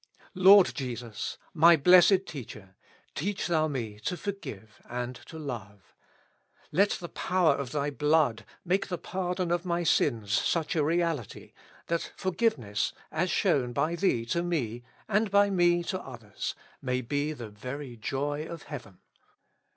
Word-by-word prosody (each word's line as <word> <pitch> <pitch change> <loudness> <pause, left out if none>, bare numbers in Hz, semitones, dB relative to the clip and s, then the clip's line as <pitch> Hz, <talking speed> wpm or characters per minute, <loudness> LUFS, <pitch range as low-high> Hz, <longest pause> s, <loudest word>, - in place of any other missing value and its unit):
Lord 190 0 +7
Jesus! 120 -5 -5 0.2
my 170 +1 +7
Blessed 180 +5 +6
Teacher! 105 - -9 0.4
teach 195 +6 -2
Thou 160 -3 +2
me 115 -8 -4
to 180 +11 -3
forgive 110 - -7
and 125 +1 -4
to 160 - -9
love. 110 -9 -8 0.8
Let 200 +2 +4
the 175 - -6
power 180 -3 +2
of 140 -3 -4
Thy 145 0 -1
blood 150 -6 +2 0.2
make 185 +3 +1
the 180 - -3
pardon 180 -1 -2
of 175 0 +1
my 175 -1 -1
sins 115 -10 +1
such 165 +8 +1
a 155 - +2
reality, 165 - -1 0.3
that 170 0 -2
for 185 - -1
giveness, 135 - 0 0.2
as 170 +4 0
shown 140 - +1
by 155 +5 0
Thee 165 -11 +1
to 170 +9 0
me, 130 -10 -2 0.3
and 215 +1 +1
by 200 +1 +4
me 175 -2 +3
to 185 +2 -3
others, 115 -6 -6 0.3
may 125 -1 -1
be 145 +5 -1
the 120 -8 -7
very 125 +4 -7
joy 145 +6 -3
of 170 -2 -8
heaven. 120 -11 -9
150 Hz, 150 wpm, -28 LUFS, 120-175 Hz, 0.8 s, Lord